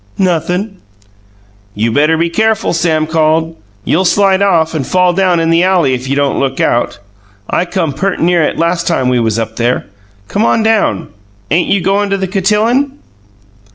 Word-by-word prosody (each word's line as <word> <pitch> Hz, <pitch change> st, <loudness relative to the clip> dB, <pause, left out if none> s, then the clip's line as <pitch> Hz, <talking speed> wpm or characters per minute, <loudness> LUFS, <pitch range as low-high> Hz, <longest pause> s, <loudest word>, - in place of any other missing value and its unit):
"Nothin'." 180 Hz, +3 st, -1 dB, 1.0 s
"You 110 Hz, +3 st, 0 dB
better 150 Hz, +5 st, +2 dB
be 170 Hz, +1 st, +1 dB
careful!" 220 Hz, +1 st, 0 dB
Sam 160 Hz, -2 st, 0 dB
called. 160 Hz, +1 st, 0 dB, 0.3 s
"You'll 180 Hz, +5 st, +1 dB
slide 195 Hz, +1 st, +2 dB
off 165 Hz, -5 st, +2 dB
and 155 Hz, -4 st, -2 dB
fall 180 Hz, -1 st, +2 dB
down 180 Hz, -2 st, +1 dB
in 165 Hz, 0 st, +1 dB
the 165 Hz, +1 st, +3 dB
alley 180 Hz, -7 st, +2 dB
if 130 Hz, +1 st, -4 dB
you 140 Hz, -, 0 dB
don't 140 Hz, -1 st, 0 dB
look 135 Hz, -1 st, -2 dB
out. 120 Hz, -, 0 dB, 0.5 s
I 180 Hz, -, 0 dB
come 170 Hz, -5 st, -2 dB
pert' 195 Hz, +7 st, -2 dB
near 175 Hz, 0 st, +2 dB
it 155 Hz, -, -1 dB
last 170 Hz, +1 st, -1 dB
time 130 Hz, -7 st, +1 dB
we 125 Hz, -1 st, +1 dB
was 110 Hz, -2 st, 0 dB
up 110 Hz, 0 st, -4 dB
there. 120 Hz, +1 st, 0 dB, 0.4 s
Come 205 Hz, -, -1 dB
on 225 Hz, -1 st, +2 dB
down! 220 Hz, -, 0 dB, 0.4 s
Ain't 170 Hz, +3 st, +1 dB
you 200 Hz, -, +2 dB
goin' 200 Hz, +3 st, 0 dB
to 195 Hz, -, 0 dB
the 190 Hz, -, -2 dB
cotillon?" 220 Hz, +9 st, 0 dB
170 Hz, 180 wpm, -13 LUFS, 155-195 Hz, 1.0 s, the